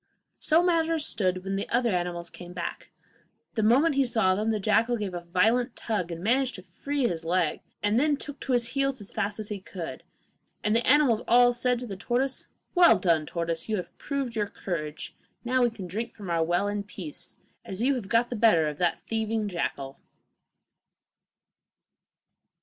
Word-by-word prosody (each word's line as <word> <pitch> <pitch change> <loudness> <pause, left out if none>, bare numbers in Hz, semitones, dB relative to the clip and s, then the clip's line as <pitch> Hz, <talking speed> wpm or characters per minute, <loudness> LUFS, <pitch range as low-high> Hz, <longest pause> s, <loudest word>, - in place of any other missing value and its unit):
So 325 +2 +3
matters 330 -3 +2
stood 185 -2 0
when 195 0 -2
the 200 - -3
other 240 -1 +2
animals 175 -1 -2
came 175 0 -10
back. 175 -1 -5 0.6
The 220 - 0
moment 265 +9 +4
he 275 0 +3
saw 220 -7 +2
them, 210 +4 0
the 220 -1 +1
jackal 225 +4 +2
gave 205 -4 -4
a 175 - -4
violent 225 +8 +2
tug, 210 -6 -2
and 170 +1 -6
managed 255 +4 +2
to 185 - -10
free 270 +9 -2
his 165 -4 -3
leg, 170 -1 0 0.2
and 205 +3 +3
then 295 +1 +2
took 290 0 -8
to 265 - -2
his 235 -1 +1
heels 275 0 0
as 205 - -9
fast 205 -1 -2
as 215 - -5
he 205 -2 -4
could. 185 -3 -7 0.6
And 210 +1 +2
the 235 - +1
animals 260 -5 +5
all 245 +1 +6
said 250 +1 +1
to - - -4
the 200 -4 -6
tortoise: 250 +6 -1 0.3
'Well 350 - +7
done, 165 -4 +2
tortoise, 170 +2 -3
you 215 - +1
have 180 - -6
proved 275 -4 -3
your 210 -2 0
courage; 155 -6 -5 0.3
now 255 +1 +2
we 240 - +4
can 220 -5 -8
drink 220 +7 -4
from 195 -5 -6
our 165 -1 +2
well 175 +4 +1
in 205 0 -1
peace, 185 -7 -9 0.3
as 190 +4 -5
you 275 +2 +3
have 230 -7 -4
got 235 +1 +2
the - - -1
better 210 -9 +4
of 150 -1 -5
that 175 -2 +1
thieving 220 -1 -1
jackal! 140 -7 -3
215 Hz, 190 wpm, -27 LUFS, 180-245 Hz, 0.6 s, Well